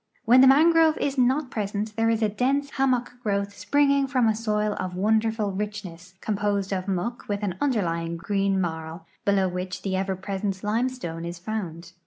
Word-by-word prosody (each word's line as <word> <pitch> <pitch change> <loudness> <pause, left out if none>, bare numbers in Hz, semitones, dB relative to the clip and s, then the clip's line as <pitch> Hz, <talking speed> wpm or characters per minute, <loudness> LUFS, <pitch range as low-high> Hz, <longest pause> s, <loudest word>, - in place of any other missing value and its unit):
W 235 - +3
hen 255 - +9
the 265 - +8
mangrove 320 +3 +5
is 280 -1 -1
not 260 +2 +1
present 210 0 -3
there 225 0 +2
is 225 0 +1
a - - +4
dense 275 +6 0
hammock 255 -3 0
growth 200 -2 -1
springing 280 +1 +2
IVom 255 -3 +2
a - - -2
soil 210 -1 0
of 180 -1 -4
wonderful 220 +1 +1
richness, 190 -3 -6
composed 205 -2 -1
of 185 0 -3
muck 200 +6 -3
with 205 0 -2
an 195 -3 -1
underlying 170 -11 0
green 195 +2 0
marl, 160 -1 -4 0.2
below 195 -2 +3
which 180 +1 -5
the 195 - -2
cver 190 0 -1
])resent 195 -1 -2
limestone 215 -6 -2
is 170 +1 -5
found. 175 -3 -5
205 Hz, 180 wpm, -25 LUFS, 185-240 Hz, 0.2 s, hen